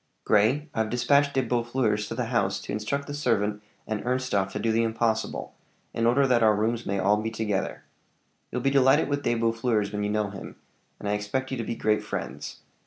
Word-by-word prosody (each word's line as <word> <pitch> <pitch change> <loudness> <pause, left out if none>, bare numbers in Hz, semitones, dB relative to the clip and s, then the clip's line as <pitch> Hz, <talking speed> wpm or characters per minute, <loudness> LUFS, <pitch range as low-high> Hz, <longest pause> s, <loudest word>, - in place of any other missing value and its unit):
"Grey, 120 +9 +3
I've 110 -1 0
dispatched 140 +4 +2
De 135 - +3
Boeffleurs 120 -3 0
to 115 - -5
the 125 0 -1
house 95 -4 +1
to - - -7
instruct 110 +7 -2
the 145 - -6
servant 105 -7 0 0.2
and 110 -1 -3
Ernstorff 125 -6 0
to - - -3
do 115 - 0
the 115 +1 +2
impossible, 115 -1 -1 0.4
in 115 0 +1
order 135 +4 +4
that 125 -3 +3
our 110 -1 +5
rooms 115 +2 -1
may 100 - 0
be - - -1
all 105 +2 +3
together. 110 -3 -2 0.7
You'll 125 - -2
be 135 +2 +2
delighted 135 +2 +4
with 145 0 0
De 120 - +1
Boeffleurs 115 -2 0
when 105 0 -2
you 105 - 0
know 105 -1 0
him, 95 - -9 0.4
and - - -5
I - - +1
expect 105 +6 -2
you 130 - -2
to 115 - -2
be 115 - -3
great 105 -1 +1
friends. 75 +3 -6
115 Hz, 210 wpm, -26 LUFS, 105-125 Hz, 0.7 s, our